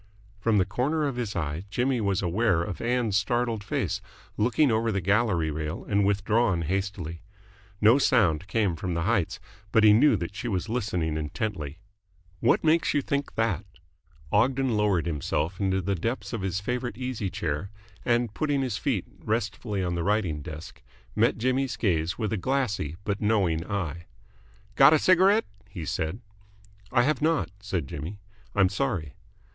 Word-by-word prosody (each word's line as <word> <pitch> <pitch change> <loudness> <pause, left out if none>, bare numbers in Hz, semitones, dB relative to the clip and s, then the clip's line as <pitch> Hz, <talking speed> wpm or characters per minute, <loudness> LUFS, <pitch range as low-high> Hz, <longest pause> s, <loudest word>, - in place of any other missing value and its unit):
From 110 0 +2
the 95 - +3
corner 135 - 0
of 140 -3 -2
his 115 -4 -3
eye 80 +1 -3
Jimmy 125 +3 0
was 100 -2 0
aware 90 -1 +2
of 95 0 -5
Ann's 120 -3 0
startled 115 +1 0
face, 105 - -2 0.3
looking 125 +5 +3
over 110 +1 +1
the 100 - 0
gallery 95 -4 +1
rail 75 0 -4
and 100 0 +2
withdrawn 100 -2 +2
hastily. 90 -2 -3 0.6
No 115 +6 +6
sound 95 - +3
came 100 -4 +1
from 85 +2 -3
the 85 - 0
heights, 100 -3 0 0.3
but 110 - +4
he 105 -1 +8
knew 125 +3 +5
that 85 +1 -5
she 120 - -5
was 95 -3 -1
listening 90 -9 -1
intently. 75 -1 -4 0.6
"What - - +3
makes 160 +1 +3
you 145 - +2
think 140 +1 -2
that?" 105 -5 0 0.7
Ogden 125 +3 +2
lowered 105 -6 +2
himself 80 +2 -2
into 95 -1 0
the 100 +3 0
depths 115 +8 -3
of 115 - -2
his 95 -1 -1
favourite 120 +1 -3
easy 125 -6 -3
chair, 80 +2 -3 0.3
and, 120 -2 +1
putting 145 -1 0
his 115 -6 -2
feet - - -1
restfully 105 -2 -2
on 90 -1 -1
the 85 - -1
writing 95 -7 0
desk, 80 +3 -9 0.3
met - - +3
Jimmy's 130 +1 0
gaze 85 -5 0
with 110 -1 -2
a - - 0
glassy 105 - -1
but 100 -1 -2
knowing 95 -7 +2
eye. 85 -5 -3 0.7
"Got 135 +7 +7
a - - +6
cigarette?" 190 +6 +4 0.2
he 85 -5 -6
said. 80 +9 -2 0.7
"I 120 -1 +4
have 145 0 +1
not," 155 - +1
said 100 -7 -3
Jimmy. 80 +10 -6 0.4
"I'm 95 -2 +5
sorry." 95 - -2
105 Hz, 165 wpm, -27 LUFS, 90-120 Hz, 0.7 s, he